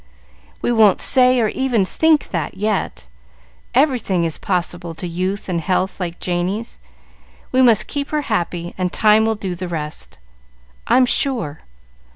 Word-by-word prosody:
"We -, -, +1 dB
won't 220 Hz, -5 st, +4 dB
say, 255 Hz, -1 st, +4 dB
or 220 Hz, -2 st, +2 dB
even 245 Hz, -6 st, 0 dB
think, 315 Hz, +8 st, +2 dB
that, 170 Hz, 0 st, -3 dB
yet. 210 Hz, -, -2 dB, 0.7 s
Everything 245 Hz, -, +2 dB
is 165 Hz, -2 st, -2 dB
possible 175 Hz, -2 st, -3 dB
to 170 Hz, -, -6 dB
youth 185 Hz, +4 st, -3 dB
and 175 Hz, -3 st, -1 dB
health 185 Hz, +2 st, -1 dB
like 175 Hz, -2 st, -4 dB
Janey's. 185 Hz, +6 st, -3 dB, 0.7 s
We 260 Hz, -, +3 dB
must 235 Hz, -5 st, +5 dB
keep 285 Hz, -1 st, -4 dB
her 300 Hz, -1 st, -1 dB
happy, 175 Hz, -7 st, -2 dB
and 180 Hz, -1 st, 0 dB
time 215 Hz, 0 st, +4 dB
will 225 Hz, 0 st, +1 dB
do 195 Hz, -3 st, -4 dB
the 180 Hz, +1 st, -5 dB
rest, 155 Hz, -3 st, -6 dB, 0.7 s
I'm 250 Hz, +2 st, +5 dB
sure. 235 Hz, -, -1 dB
200 Hz, 150 wpm, -19 LUFS, 175-240 Hz, 0.7 s, must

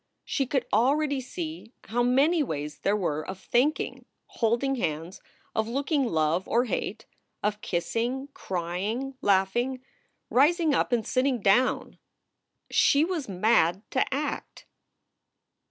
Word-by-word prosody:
She 270 Hz, -3 st, -1 dB
could 265 Hz, 0 st, 0 dB
already 275 Hz, +5 st, +2 dB
see 315 Hz, -2 st, -7 dB
how 240 Hz, +2 st, -1 dB
many 275 Hz, +7 st, +3 dB
ways 150 Hz, -, -4 dB
there 205 Hz, +1 st, +1 dB
were 155 Hz, -6 st, -1 dB
of 190 Hz, +2 st, -7 dB
thinking, 255 Hz, +9 st, 0 dB, 0.2 s
holding 235 Hz, +4 st, 0 dB
hands, 165 Hz, -2 st, -3 dB, 0.3 s
of 220 Hz, 0 st, 0 dB
looking 275 Hz, +3 st, 0 dB
love 165 Hz, -2 st, +1 dB
or 240 Hz, +2 st, +2 dB
hate, -, -, -3 dB, 0.4 s
of 210 Hz, 0 st, -1 dB
kissing, 240 Hz, +10 st, -2 dB
crying, 190 Hz, +9 st, -3 dB
laughing, 240 Hz, +7 st, +1 dB, 0.5 s
rising 310 Hz, +4 st, +4 dB
up -, -, +1 dB
and 235 Hz, -3 st, +1 dB
sitting 255 Hz, -1 st, +1 dB
down. 215 Hz, +6 st, +2 dB, 0.7 s
She 285 Hz, +3 st, +4 dB
was 330 Hz, -, -3 dB
mad 185 Hz, -1 st, +2 dB
to 265 Hz, -, +1 dB
act. 285 Hz, +3 st, -4 dB
240 Hz, 120 wpm, -27 LUFS, 190-275 Hz, 0.7 s, rising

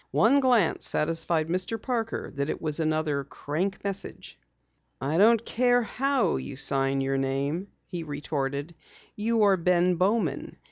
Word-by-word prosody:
One 255 Hz, +6 st, +4 dB
glance 245 Hz, -10 st, +2 dB
satisfied 165 Hz, 0 st, +2 dB
Mr. 185 Hz, +6 st, -2 dB
Parker 230 Hz, -3 st, -3 dB
that 140 Hz, +1 st, -3 dB
it -, -, -3 dB
was 155 Hz, -1 st, 0 dB
another 155 Hz, -3 st, 0 dB
"crank" 160 Hz, +8 st, -4 dB
message. 200 Hz, -1 st, -5 dB, 0.6 s
"I 140 Hz, +5 st, -1 dB
don't 230 Hz, +2 st, +4 dB
care 245 Hz, 0 st, +2 dB
how 265 Hz, -, 0 dB
you 65 Hz, 0 st, -7 dB
sign 135 Hz, 0 st, +2 dB
your 135 Hz, 0 st, -1 dB
name," 140 Hz, +7 st, -2 dB, 0.2 s
he 175 Hz, -2 st, -6 dB
retorted. 145 Hz, 0 st, -4 dB, 0.4 s
"You 225 Hz, +1 st, +1 dB
are 200 Hz, -2 st, +4 dB
Ben 180 Hz, 0 st, +2 dB
Bowman. 185 Hz, -6 st, -1 dB
170 Hz, 140 wpm, -26 LUFS, 145-215 Hz, 0.6 s, One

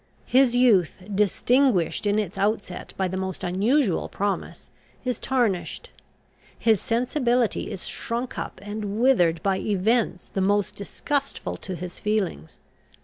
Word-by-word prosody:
His 255 Hz, -1 st, +4 dB
youth, 225 Hz, -9 st, +4 dB, 0.2 s
distinguished 210 Hz, -, +2 dB
in 205 Hz, +1 st, +2 dB
its 205 Hz, -4 st, -2 dB
outset 205 Hz, -3 st, -2 dB
by 190 Hz, -, +1 dB
the 185 Hz, +1 st, -4 dB
most 190 Hz, -1 st, -4 dB
unusual 200 Hz, -, +1 dB
promise, 200 Hz, 0 st, -3 dB, 0.3 s
is 250 Hz, -1 st, -1 dB
tarnished. 235 Hz, -9 st, -1 dB, 0.7 s
His 220 Hz, -4 st, +3 dB
sensibility 245 Hz, 0 st, +1 dB
is 185 Hz, -, -6 dB
shrunk 240 Hz, +2 st, -3 dB
up -, -, -6 dB
and 205 Hz, 0 st, -4 dB
withered 175 Hz, -11 st, +3 dB
by 195 Hz, -1 st, +1 dB
events 210 Hz, 0 st, 0 dB
the 195 Hz, -, -2 dB
most 200 Hz, +1 st, +1 dB
disgustful 275 Hz, +7 st, -2 dB
to 185 Hz, -, -5 dB
his 175 Hz, +1 st, -7 dB
feelings. 205 Hz, -, -2 dB
205 Hz, 130 wpm, -25 LUFS, 190-240 Hz, 0.7 s, His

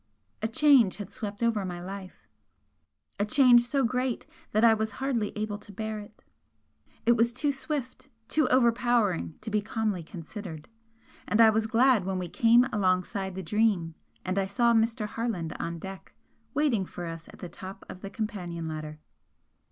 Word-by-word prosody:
A 220 Hz, -, +1 dB
change 245 Hz, -4 st, +5 dB
had 205 Hz, -2 st, -7 dB
swept 210 Hz, -2 st, -5 dB
over 225 Hz, -3 st, +1 dB
my 180 Hz, -2 st, -5 dB
life, 190 Hz, +1 st, -9 dB, 0.9 s
a -, -, +2 dB
change 245 Hz, +1 st, +6 dB
so 270 Hz, +3 st, 0 dB
great 250 Hz, 0 st, -1 dB, 0.3 s
that 215 Hz, +2 st, +4 dB
I 225 Hz, -, +7 dB
was 220 Hz, -1 st, -2 dB
hardly 255 Hz, -6 st, -1 dB
able 210 Hz, -1 st, -3 dB
to 205 Hz, -, -12 dB
bear 215 Hz, +2 st, -4 dB
it. 205 Hz, -, -13 dB, 0.8 s
It 235 Hz, -, +5 dB
was 235 Hz, 0 st, +3 dB
too 285 Hz, +4 st, 0 dB
swift, 270 Hz, -1 st, -5 dB, 0.2 s
too 310 Hz, -, +2 dB
overpowering 235 Hz, -8 st, +2 dB
to 215 Hz, 0 st, -5 dB
be 210 Hz, 0 st, +2 dB
calmly 215 Hz, -3 st, -2 dB
considered, 165 Hz, 0 st, -8 dB, 0.6 s
and 210 Hz, -, +1 dB
I 225 Hz, -1 st, +8 dB
was 220 Hz, 0 st, 0 dB
glad 235 Hz, -1 st, +4 dB
when 190 Hz, 0 st, -1 dB
we 180 Hz, -1 st, -4 dB
came 235 Hz, +5 st, +5 dB
alongside 190 Hz, 0 st, 0 dB
the 190 Hz, -, -5 dB
'Dream' 195 Hz, -3 st, +1 dB, 0.3 s
and 185 Hz, +2 st, 0 dB
I 195 Hz, -, 0 dB
saw 235 Hz, +4 st, +3 dB
Mr. 225 Hz, 0 st, +2 dB
Harland 210 Hz, -7 st, -3 dB
on 170 Hz, 0 st, -3 dB
deck, 190 Hz, +3 st, -9 dB, 0.4 s
waiting 280 Hz, -9 st, +2 dB
for 175 Hz, -1 st, -7 dB
us 165 Hz, 0 st, -7 dB
at -, -, -13 dB
the 180 Hz, -, -7 dB
top 185 Hz, +3 st, -10 dB
of 185 Hz, -, -10 dB
the 195 Hz, -, -6 dB
companion 180 Hz, -7 st, -4 dB
ladder. 155 Hz, -1 st, -6 dB
215 Hz, 170 wpm, -28 LUFS, 185-235 Hz, 0.9 s, I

